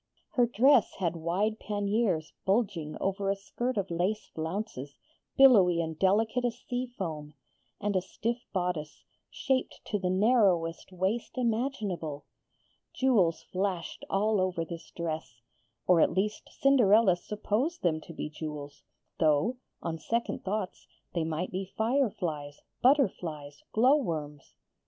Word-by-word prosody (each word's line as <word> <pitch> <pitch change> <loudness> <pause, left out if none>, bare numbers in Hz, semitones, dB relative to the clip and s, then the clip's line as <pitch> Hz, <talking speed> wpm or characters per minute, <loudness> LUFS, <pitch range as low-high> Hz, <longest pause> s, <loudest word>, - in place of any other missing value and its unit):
Her 245 -2 +3
dress 245 +1 +4
had 175 -3 -1
wide 190 +7 -1
panniers 205 -5 0
bulging 190 -7 0
over 195 0 -1
a 195 - +2
skirt 240 +5 -3
of 195 -3 -1
lace 185 +6 -1
flounces, 160 -4 -4 0.4
billowy 200 -11 +7
and 160 -1 -3
delicate 220 +6 +2
as 240 -1 -1
sea 250 0 -3
foam, 160 - -6 0.4
and 205 0 -1
a 185 - +3
stiff 230 +6 -3
bodice, 175 -5 -3 0.3
shaped 265 -2 -1
to 205 - -1
the 185 -1 -1
narrowest 190 -5 +2
waist 190 +8 -2
imaginable. 220 - -2 0.7
Jewels 210 -11 +2
flashed 185 -2 -3
all 205 0 +2
over 180 -3 -1
this 165 -1 -8
dress 155 -8 -5 0.4
or 180 -3 +5
at - - +3
least 210 +3 -1
Cinderella 225 -8 +5
supposed 215 - -2
them 160 -3 +1
to - - -11
be 165 - -4
jewels, 150 -2 -7 0.4
though, 160 - +3 0.3
on 165 -1 -3
second 235 +6 -2
thoughts, 195 -1 -3 0.3
they 170 - 0
might 160 +3 -2
be 190 +1 -5
fireflies, 190 - -1 0.2
butterflies, 170 - +1
glowworms. 170 - +1
190 Hz, 130 wpm, -29 LUFS, 165-225 Hz, 0.7 s, billowy